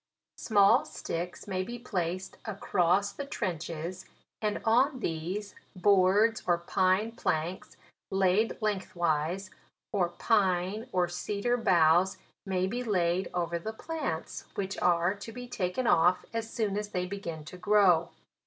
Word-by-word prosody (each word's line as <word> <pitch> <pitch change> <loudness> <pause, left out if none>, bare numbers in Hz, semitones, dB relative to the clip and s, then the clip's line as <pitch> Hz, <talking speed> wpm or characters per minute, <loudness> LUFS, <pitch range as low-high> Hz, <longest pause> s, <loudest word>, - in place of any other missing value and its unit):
" - - -62
Small 200 -3 +4
sticks 170 +1 -5
may 185 -2 -1
be 235 +6 -5
placed 185 -5 -3
across 195 -2 +1
the 280 - -6
trenches, 175 - -4 0.3
and 210 -1 0
on 255 +4 +3
these, 185 +3 -3 0.2
boards 200 +4 +4
or 175 -1 +4
pine 185 +5 +1
planks 170 -5 -3 0.3
laid 195 +3 +2
lengthwise, 185 -3 -1 0.4
or 185 -4 +2
pine 190 +2 +1
or 180 -1 +2
cedar 200 +7 -1
boughs 175 -4 +4 0.3
may 185 -1 +1
be 245 +6 -2
laid 180 -4 +1
over 170 -1 -1
the 220 +6 -5
plants, 280 - -4
which 195 0 -3
are 175 +1 +3
to 205 +2 -9
be 245 +2 -8
taken 210 +1 -2
off 180 -4 +4
as 225 0 -3
soon 210 -3 -1
as 210 0 -5
they 180 -3 -2
begin 170 -5 -6
to 180 - -9
grow. 180 -3 +4
190 Hz, 135 wpm, -29 LUFS, 175-210 Hz, 0.4 s, Small